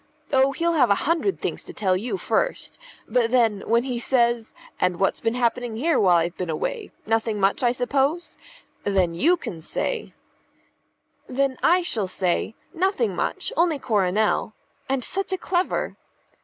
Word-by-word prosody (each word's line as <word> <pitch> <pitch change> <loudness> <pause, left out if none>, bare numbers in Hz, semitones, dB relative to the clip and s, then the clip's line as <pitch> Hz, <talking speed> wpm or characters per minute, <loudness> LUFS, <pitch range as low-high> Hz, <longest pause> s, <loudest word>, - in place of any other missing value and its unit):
Oh, 265 0 +4
he'll 335 +5 0
have 260 -8 +4
a 200 - +5
hundred 335 +5 +1
things - - -3
to - - -10
tell 190 -3 +1
you 235 - -2
first; - - -1 0.3
but 240 -2 +2
then, 230 -5 +2
when 235 +1 +3
he 250 -2 -3
says 235 -2 +1 0.3
'And 180 -1 +1
what's 195 - +1
been 225 +1 0
happening 240 -1 0
here 310 +3 +2
while 180 -3 +5
I've 170 +1 0
been 180 -2 -3
away? 425 - -3 0.2
Nothing 225 -1 0
much, 195 +6 +2
I 240 -2 +3
suppose?' 275 +7 0 0.5
then 190 -4 +1
you 335 - +3
can 165 - -7
say 455 - -3 0.6
" - - -44
"Then 275 -1 +2
I 355 +2 +4
shall 220 - -1
say, 185 +4 -1 0.2
'Nothing 385 +6 0
much; - - -2
only 335 -3 +2
Coronel.' 215 -2 +1 0.3
And 265 -2 0
such 390 +7 -2
a - - 0
clever!" 360 0 -1
245 Hz, 165 wpm, -24 LUFS, 205-330 Hz, 0.6 s, a